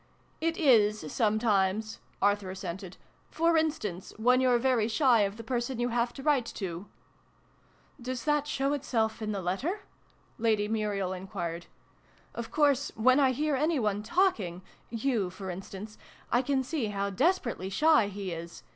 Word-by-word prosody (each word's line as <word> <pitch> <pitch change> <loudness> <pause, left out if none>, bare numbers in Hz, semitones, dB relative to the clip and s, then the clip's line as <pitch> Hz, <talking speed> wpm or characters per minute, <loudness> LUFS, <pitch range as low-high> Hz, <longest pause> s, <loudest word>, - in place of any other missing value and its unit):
"It 330 +1 0
is, 215 - +3
sometimes," 215 -1 +1 0.2
Arthur 205 -1 +2
assented. 185 0 -6 0.2
" - - -36
For 335 +1 +3
instance, 295 - -1
when 250 +3 +4
you're 250 -2 +4
very 240 -3 +2
shy 245 0 +4
of 200 +1 -1
the 230 - -7
person 240 +1 -2
you 240 0 +1
have 240 0 0
to 270 - -9
write 275 -6 +2
to.' 185 -1 -5 0.6
" - - -29
Does 250 0 -4
that 295 -1 +1
show 275 -1 0
itself 230 -6 -1
in 215 -1 -2
the 200 -2 -3
letter? 275 - -2 0.3
" - - -36 0.3
Lady 215 -2 +2
Muriel 205 -4 -1
enquired. 175 -2 -5 0.4
" - - -32
Of 235 -1 -5
course, 285 -2 +2
when 255 +5 +4
I 270 -2 +5
hear 295 +3 0
any 305 +4 +1
one 210 -4 0
talking 215 - 0 0.3
yoii, 230 -5 0
for 190 0 -6
instance 195 +3 -8 0.3
I 245 - +4
can 265 0 0
see 265 -3 -2
how 200 -1 -2
desperately 245 - 0
shy 300 +2 +4
he 200 -2 -5
is 170 0 -7
225 Hz, 165 wpm, -29 LUFS, 200-270 Hz, 0.6 s, I